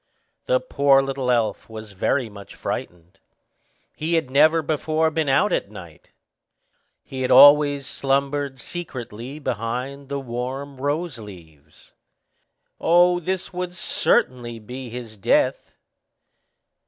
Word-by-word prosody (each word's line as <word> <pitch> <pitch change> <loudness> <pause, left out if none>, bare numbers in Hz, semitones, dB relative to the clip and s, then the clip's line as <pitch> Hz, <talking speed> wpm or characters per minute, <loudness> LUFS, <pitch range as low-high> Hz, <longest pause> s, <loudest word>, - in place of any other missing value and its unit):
The - - +3
poor 140 - +3
little 135 -2 -3
elf 115 -3 0
was 110 -1 -9
very 115 +6 0
much 100 -2 -12
frightened. 90 +2 -6 0.8
He 165 +2 -1
had 160 -6 -1
never 155 +4 +4
before 155 +1 0
been 160 -2 -1
out 135 - +3
at - - -1
night, - - -13 1.0
but 130 - -7
had 130 - -1
always 145 +1 +7
slumbered 140 +1 -1
secretly 130 -5 -7
behind 130 +2 -4
the 140 0 -2
warm 130 +2 -5
rose 145 0 -2
leaves. 80 -8 -15 0.9
Oh, 175 +1 +4
this 185 +2 -4
would 180 0 -4
certainly 125 - 0
be 125 +3 -8
his 115 -2 -8
death. 95 - 0
135 Hz, 115 wpm, -22 LUFS, 120-155 Hz, 1.0 s, always